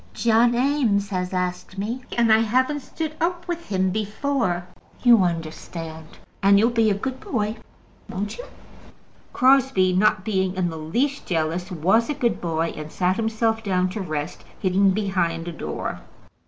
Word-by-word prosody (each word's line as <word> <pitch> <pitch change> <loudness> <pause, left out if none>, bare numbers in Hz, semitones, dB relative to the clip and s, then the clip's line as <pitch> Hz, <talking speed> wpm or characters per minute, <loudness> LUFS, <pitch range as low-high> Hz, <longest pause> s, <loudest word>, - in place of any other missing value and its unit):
John 235 +1 +3
Eames 240 -7 +1
has 180 -2 -2
asked 180 0 -3
me, 225 +6 -3 0.2
and 230 -2 +5
I 220 - +6
haven't 255 +6 +1
stood 310 +3 -5
up 345 +1 -1
with 340 -1 -4
him 190 -1 +1
before. 215 -3 -1 0.4
You 240 -4 +7
understand, 165 -1 -5 0.2
and 200 0 +6
you'll 225 +4 +4
be 225 -2 +3
a 200 - +2
good 260 +6 -4
boy, 215 -2 -2 0.5
won't 205 - -4
you?" - - -6 0.9
Crosbie, 260 -8 +4
not 200 +1 +2
being 190 -3 0
in 180 -2 0
the 160 - -6
least 240 - -1
jealous, 170 +1 -1
was 190 - +2
a 295 - -1
good 245 -5 0
boy, 165 -1 -1
and 155 0 -7
sat 185 0 0
himself 225 0 0
down 185 -3 +1
to 205 +3 -4
rest, 155 -1 -4 0.2
hidden 195 +1 +3
behind 185 -4 -1
a - - -3
door. 165 - -5
200 Hz, 160 wpm, -23 LUFS, 180-235 Hz, 0.9 s, You